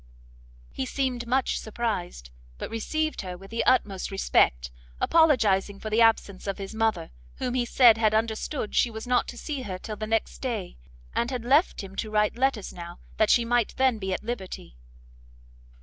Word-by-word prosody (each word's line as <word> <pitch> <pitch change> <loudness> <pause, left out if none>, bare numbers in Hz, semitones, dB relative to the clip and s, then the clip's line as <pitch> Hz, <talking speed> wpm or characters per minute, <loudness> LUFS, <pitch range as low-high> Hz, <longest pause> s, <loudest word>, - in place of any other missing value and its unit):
He 260 - -4
seemed 250 -3 -2
much 260 +2 +1
surprised, 205 - -4 0.3
but - - -6
received 310 +8 -2
her 180 -2 -6
with 195 +3 -14
the 230 - 0
utmost 205 -7 +2
respect, - - +2 0.3
apologizing 215 - +3
for 215 - -6
the 225 +2 +3
absence 210 -4 +2
of 195 - -2
his 195 +1 -7
mother, 220 -6 0 0.2
whom 250 -1 -3
he 250 -1 +1
said 235 -2 +6
had 215 -1 +3
understood 220 +2 -2
she 245 - +3
was 220 -1 -7
not 245 0 +2
to 240 - -8
see 285 +1 -4
her 190 -6 -5
till 215 +3 -7
the 215 - -4
next 225 0 -1
day, 225 -8 -4 0.4
and 235 - 0
had 250 -3 -4
left 285 - +3
him 195 0 -10
to 220 - -3
write 210 -1 +1
letters 255 -4 0
now, 175 0 -9 0.2
that 215 - +3
she 235 - +4
might 240 -1 +1
then 260 -4 +2
be 190 -1 -3
at 185 - -2
liberty. 195 - -6
225 Hz, 180 wpm, -26 LUFS, 195-245 Hz, 0.4 s, said